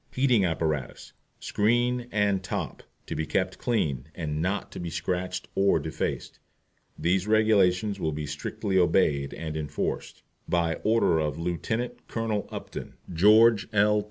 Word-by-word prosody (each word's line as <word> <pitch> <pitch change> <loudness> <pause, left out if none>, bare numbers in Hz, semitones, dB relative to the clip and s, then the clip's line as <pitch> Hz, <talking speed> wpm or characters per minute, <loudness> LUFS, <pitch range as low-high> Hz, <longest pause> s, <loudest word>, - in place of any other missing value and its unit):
HEATING 125 -6 +3
APPARATUS, 80 -5 -2 0.3
SCREEN 120 +3 +1
AND 100 -2 +1
TOP. 90 - -4 0.2
To - - -5
be 80 - -2
kept - - -1
clean, 75 - -1
and 75 -3 -3
not 95 +4 -2
to - - -7
be 85 - -4
scratched 90 +3 -3
or 100 0 +3
defaced. 80 - -4 0.6
These 95 +3 +1
Regulations 105 -2 +3
will 80 - -1
be 75 0 -4
strictly 95 +6 -2
obeyed 75 -5 +2
and 80 -2 -5
enforced. 75 -2 -4 0.3
By 85 -1 +1
order 110 -7 +3
of 75 -1 -1
LIEUT. 110 +9 -3
COLONEL 110 -3 -2
UPTON, - - -7 0.2
GEORGE 105 +3 +6
L. 105 0 +4
95 Hz, 135 wpm, -27 LUFS, 80-110 Hz, 0.6 s, GEORGE